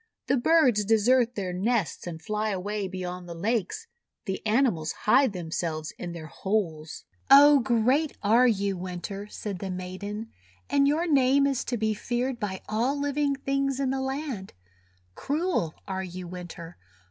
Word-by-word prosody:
The - - +2
birds 255 -6 +4
desert 235 +3 +3
their 185 -3 -3
nests 200 -1 -1
and 165 -2 -6
fly 215 +3 -2
away 200 +1 -2
beyond 180 -1 -6
the 170 - -6
lakes. 225 - -1 0.4
The 190 - -4
animals 210 - +1
hide 265 +3 +4
themselves 160 -3 -4
in 175 - -5
their 170 -2 -7
holes." 165 -4 -3 0.2
"Oh! 285 +1 +9
great 255 +5 +1
are 230 +5 +5
you, 200 -3 +1
Winter," 185 +3 -6
said 205 -3 -6
the 195 - -5
maiden, 190 +4 -6 0.4
"and 280 0 +4
your 310 +4 +2
name 275 -3 +4
is 275 -2 0
to 245 - -2
be 220 0 0
feared 240 +3 -2
by 190 -3 -4
all 245 +7 0
living 285 0 0
things 275 0 -1
in 270 -2 0
the 265 0 -1
land! 265 -7 -4 0.6
Cruel 295 - -1
are 190 -1 -3
you, 180 0 -7
Winter! 175 -1 -9
215 Hz, 155 wpm, -27 LUFS, 185-265 Hz, 0.6 s, Oh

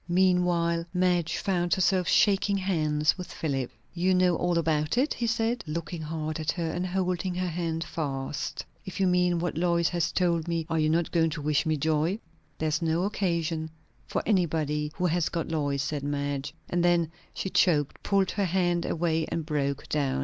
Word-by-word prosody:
Meanwhile 175 -2 +2
Madge 180 -2 +2
found 175 -3 +1
herself 185 -1 +2
shaking 200 -2 +3
hands 155 -4 +1
with 180 - -6
Philip. 135 -5 -2 0.2
"You 180 +2 +2
know 180 -1 +4
all 175 0 +1
about 155 +2 +1
it?" 275 +5 +2
he 235 - -2
said, 230 +1 0
looking 165 +2 -4
hard 155 0 -3
at 155 - 0
her, 165 -3 -2
and 180 +2 -2
holding 185 0 -1
her 180 0 -1
hand 165 -1 -2
fast. 140 -3 -4 0.2
"If 190 - -7
you 195 - +3
mean 180 -1 +3
what 165 -2 -2
Lois 170 -1 +2
has 175 -2 0
told 170 -3 +1
me 165 -1 -1
" - - -32
"Are 165 - +1
not 155 +2 +2
you - - -30
going 165 -2 +3
to 155 -1 -5
wish 150 +2 +1
me 155 -1 +1
joy?" 155 +5 +1 0.4
"There 155 - 0
is 155 +2 0
no 165 +1 +1
occasion 170 -5 -1 0.4
for - - -1
anybody 155 -6 +1
who 180 - -1
has 175 -1 +1
got 165 - -3
Lois," 145 -4 0
said 145 -1 -2
Madge. 145 0 -3
And 175 0 0
then 170 -2 +3 0.2
she 190 - -3
choked, 150 -5 +2
pulled 195 -2 +2
her 200 -1 0
hand 175 -1 +1
away, 160 -1 0
and 165 - -3
broke 140 -2 -1
down. 135 -3 0
170 Hz, 190 wpm, -28 LUFS, 155-180 Hz, 0.4 s, know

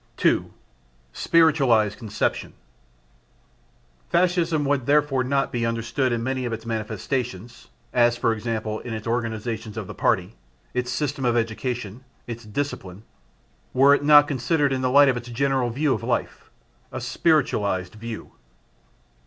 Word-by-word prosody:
2. - - +1 0.6
Spiritualised 135 -11 +3
Conception. 105 -3 -2 1.6
Fascism 170 -3 +2
would 140 -3 0
therefore 145 -2 +3
not 135 +2 0
be 120 -3 -2
understood 115 +3 -1
in 115 -1 -1
many 130 +1 -2
of 120 - -3
its 115 0 -5
manifestations 115 0 -4 0.3
(as, 120 -1 +3
for 115 - +1
example, 110 -1 -3
in 115 -2 -6
its 110 - -7
organisations 115 -1 -3
of - - -4
the - - -8
Party, 95 +4 0 0.4
its 125 0 -2
system 140 0 -2
of 120 -1 +2
education, 115 0 -3 0.2
its 115 -1 -7
discipline) 105 -5 -5 0.7
were 135 +2 +6
it 145 - +1
not 145 0 +7
considered 145 +1 +1
in 130 - -1
the 130 - +1
light 140 +2 +6
of 130 -2 +2
its 120 0 -7
general 130 0 0
view 140 +4 +1
of - - -3
life. 120 0 -3 0.4
A - - -5
spiritualised 100 - 0
view. 110 +1 -8
120 Hz, 140 wpm, -24 LUFS, 115-140 Hz, 1.6 s, not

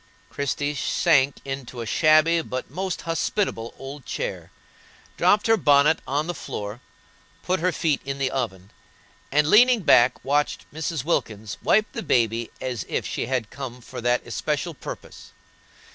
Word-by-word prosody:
Christie 145 +1 -2
sank 145 -2 +2
into 135 -3 -6
a - - -4
shabby 155 +5 +4
but 130 -4 -5
most 185 +3 -3
hospitable 165 - -2
old 135 +1 -8
chair, - - -4 0.7
dropped 205 +4 +3
her 225 0 +4
bonnet 145 -1 +4
on 145 +3 0
the 175 - -3
floor, 105 -6 -6 0.6
put 185 +1 0
her 180 +3 +1
feet 155 -4 0
in 135 0 -4
the 135 -2 -1
oven, 100 -8 -4 0.6
and, 150 +2 +3
leaning 240 +5 +6
back, 125 -7 +4
watched 145 +2 0
Mrs. 160 -2 -3
Wilkins 110 -9 -2
wipe 215 0 +3
the - - -5
baby 115 - +1
as 125 -3 -3
if - - -1
she - - -3
had 125 -5 -2
come 130 -3 -7
for 120 - -9
that 120 +1 +1
especial - - -2
purpose. - - -10
140 Hz, 150 wpm, -24 LUFS, 125-165 Hz, 0.7 s, leaning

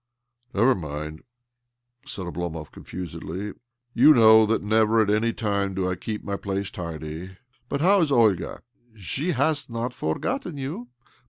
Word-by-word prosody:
" 120 +1 -45
Never 120 +6 +5
mind," 75 - -6 0.9
said 100 -9 -5
Oblomov 85 -3 -5
confusedly. 90 +3 -6 0.2
" 120 0 -51
You 150 +3 +9
know 110 -2 +7
that 115 -1 0
never 110 +1 +3
at 105 -2 +3
any 110 +2 +2
time 100 -4 -1
do 95 -1 0
I 90 - 0
keep 105 +3 -5
my 100 -1 -3
place 100 0 -3
tidy. 85 +1 -7 0.3
But 140 - -1
how 195 +3 +5
is 155 -3 +1
Olga?" 110 -8 +2 0.2
" 120 -2 -33
She 135 - -2
has 145 +1 0
not 120 +1 -3
forgotten 175 - -3
you. 135 -2 -5
105 Hz, 160 wpm, -25 LUFS, 90-120 Hz, 0.9 s, You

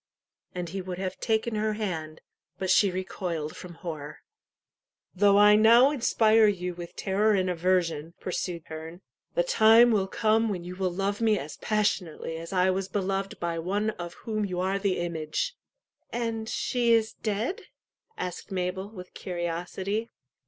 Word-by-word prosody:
"And 175 -1 -3
he 190 +3 -4
would 180 -1 -6
have 185 0 -4
taken 220 +1 0
her 215 0 0
hand; 165 -7 -4 0.4
but 190 -1 -1
she 200 - +5
recoiled 180 -4 -4
from 175 -2 -10
horror. 155 -4 -7 0.9
"Though 200 +1 +4
I 210 0 +7
now 235 +5 +7
inspire 225 -5 +4
you 180 -3 -1
with 170 0 -9
terror 210 +3 +2
and 185 -2 +1
aversion," 170 -2 0
pursued 175 -2 -3 0.7
"the - - +3
time 235 - +6
will 200 -3 +2
come 220 +2 +2
when 185 -4 -3
you 180 +1 -7
will 190 0 0
love 195 +4 -2
me 220 -2 +3
as 150 -3 -6
passionately 190 -7 -1
as 165 +2 -8
I 185 0 +3
was 190 0 -2
beloved 195 0 -2
by 170 -1 -2
one 205 +6 0
of 175 -4 -8
whom 215 -2 -1
you 180 -3 -2
are 190 +2 0
the 195 -2 0
image." 170 - -2 0.6
And 230 -2 -2
she 240 -2 +1
is 225 -1 +2
dead? 220 - -3 0.5
"asked 180 +2 -5
Mabel, 190 +1 -2
with 185 -4 -11
curiosity. 180 +5 -3
190 Hz, 155 wpm, -27 LUFS, 180-215 Hz, 0.9 s, I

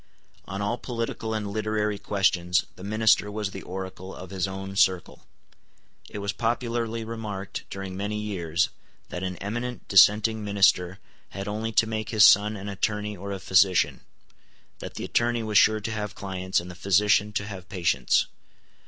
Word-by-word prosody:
On 100 0 -4
all 120 +4 -1
political 115 -2 -3
and 105 -2 -3
literary 105 -1 -1
questions 90 -3 +1
the 90 - -12
minister 110 0 +3
was 105 -1 -3
the 95 - -7
oracle 95 0 -7
of 95 0 -10
his 95 -1 -1
own 95 0 -6
circle. 95 -3 +1 0.8
It - - -7
was 100 0 -2
popularly 115 -1 -1
remarked, 110 -4 -6
during 95 -1 -6
many 105 +2 -3
years, 90 -5 -1 0.4
that 90 - -5
an 95 -1 -3
eminent 120 +6 -5
dissenting 105 +3 +5
minister 95 -3 +3 0.3
had 100 0 -6
only 110 +2 -3
to 115 - +4
make 110 -1 -4
his 110 -3 +6
son 105 +2 +6
an 100 +1 -7
attorney 105 +1 -2
or 100 +2 -7
a 100 - -3
physician; 95 -1 +3 0.8
that - - -8
the - - -4
attorney 120 -1 +1
was 105 -2 +4
sure 110 0 +4
to 110 - -3
have 105 -2 -4
clients, 95 -1 -2
and 90 +1 -8
the - - -9
physician 100 +3 +3
to 100 - -1
have 95 -3 -9
patients. 85 -10 +2
100 Hz, 165 wpm, -26 LUFS, 95-110 Hz, 0.8 s, his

